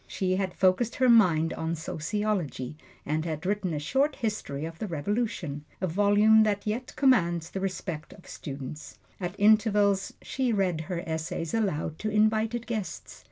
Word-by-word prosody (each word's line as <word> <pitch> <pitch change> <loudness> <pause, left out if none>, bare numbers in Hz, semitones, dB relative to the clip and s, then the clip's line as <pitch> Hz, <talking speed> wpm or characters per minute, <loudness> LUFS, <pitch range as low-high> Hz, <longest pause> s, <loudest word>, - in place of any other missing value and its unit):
She 185 -1 -1
had 190 -2 -2
focused 190 +5 +2
her 255 - +3
mind 170 -9 +5
on 160 +1 -2
sociology 165 - -2 0.3
and 155 +2 -1
had 160 0 -4
written 195 -2 0
a 155 - -2
short 270 - +1
history 180 -10 -3
of 165 0 -8
the 215 - -3
Revolution, 170 -3 -2 0.2
a 185 - 0
volume 205 +4 +5
that 205 -2 +1
yet 230 +4 -3
commands 175 - +2
the 195 - -3
respect 180 -5 -4
of 195 -2 -15
students. 140 +1 -7 0.2
At 180 0 -5
intervals 205 -2 +3
she 260 -2 -1
read 185 -6 +1
her 170 +2 -4
essays 160 0 -3
aloud 175 -8 -1
to 215 - -2
invited 220 +2 +1
guests. 220 -5 -5
190 Hz, 160 wpm, -28 LUFS, 160-215 Hz, 0.3 s, mind